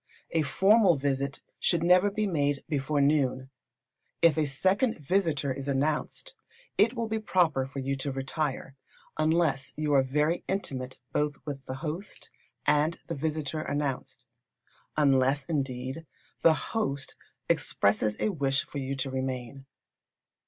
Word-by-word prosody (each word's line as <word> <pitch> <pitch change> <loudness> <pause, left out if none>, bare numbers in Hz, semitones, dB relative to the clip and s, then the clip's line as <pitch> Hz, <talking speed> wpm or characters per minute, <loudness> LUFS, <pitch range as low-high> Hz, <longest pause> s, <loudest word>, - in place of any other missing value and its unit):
A 165 - +2
formal 190 - +4
visit 140 -1 -2 0.2
should 170 -2 +2
never 180 +3 +5
be 210 +1 -1
made 145 -6 0
before 145 0 0
noon. 135 -2 +1 0.7
If 165 -3 +6
a 155 -2 +1
second 190 - +1
visitor 150 -3 0
is 140 +1 -6
announced, 150 - -1 0.4
it 230 +4 +3
will 230 -1 -2
be 220 0 -1
proper 165 -10 +2
for 135 - -10
you 135 +1 -1
to 135 +1 -2
retire, 135 0 -3 0.4
unless 155 -3 +1
you 150 -1 0
are 135 - +6
very 150 +5 0
intimate 130 -10 -3
both 150 -1 0
with 140 -2 -6
the 130 - -5
host 165 +7 -5 0.3
and 150 +3 +2
the - - -4
visitor 155 +1 -2
announced; 135 -4 -3 0.7
unless, 135 -1 +3
indeed, 135 +1 -3 0.3
the 165 -1 +6
host 145 -10 -3 0.3
expresses 105 +1 +1
a - - +1
wish 135 -7 0
for 145 - -6
you 135 0 -3
to 135 0 -3
remain. 130 0 -4
145 Hz, 140 wpm, -28 LUFS, 135-165 Hz, 0.7 s, If